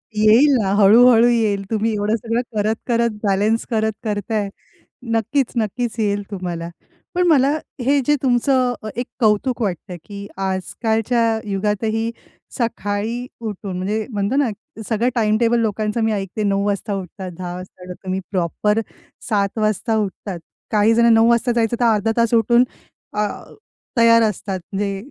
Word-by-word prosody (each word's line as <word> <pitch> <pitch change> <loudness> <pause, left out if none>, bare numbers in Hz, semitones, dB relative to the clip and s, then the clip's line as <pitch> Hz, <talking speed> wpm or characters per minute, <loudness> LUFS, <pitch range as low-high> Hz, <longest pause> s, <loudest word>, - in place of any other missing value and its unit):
येईल 225 +7 +5
ना 190 - 0
हळू-हळू 230 +4 +6
येईल. 220 -4 +1
तुम्ही 220 +1 +1
एवढं 210 +2 0
सगळं 230 +1 -1
करत, 215 +1 +1
करत 235 -1 +2
बॅलन्स 205 +3 +1
करत 220 -1 +1
करताय. 210 -1 -2 0.6
नक्कीच, 235 +4 0
नक्कीच 225 +2 -1
येईल 205 -1 0
तुम्हाला. 175 -3 -4 0.5
पण 360 0 +2
मला 280 -4 +4 0.3
हे 280 +3 +3
जे 295 - +3
तुमचं 255 0 +2
अ, - - -5
एक 245 +1 -2
कौतुक 230 +3 +1
वाटतंय, 180 -3 -3
की 200 -1 -8
आजकालच्या 220 +4 0
युगातही 215 +3 -1 0.5
सकाळी 230 +1 -2
उठून 205 -4 -5
म्हणजे 210 +4 -2
म्हणतो 205 +3 -1
ना, 280 -4 +2 0.4
सगळं 235 +2 +1
टाईम 215 -2 +2
टेबल 235 0 +2
लोकांचं 215 0 -1
मी 220 - +2
ऐकते. 200 +1 -3
09:00 200 0 +1
वाजता 205 +1 -1
उठतात 185 0 -7
10:00 180 -1 -5
वाजता 185 0 -11
उठतात. 180 0 -8
तुम्ही 185 0 -2
प्रॉपर 205 +4 0 0.5
07:00 200 -1 0
वाजता 215 +1 0
उठतात. 195 -2 -4 0.3
काही 215 +1 +4
जण 235 +1 +4
09:00 225 0 +5
वाजता 235 +1 +2
जायचं 235 -1 +1
तर 240 - +2
अर्धा 215 +2 +1
तास 235 0 +2
उठून 235 +2 +4 0.5
अ, 210 0 0 0.7
तयार 230 0 +6
असतात 195 -2 -2
म्हणजे 200 0 -1
215 Hz, 150 wpm, -20 LUFS, 200-235 Hz, 0.7 s, हळू-हळू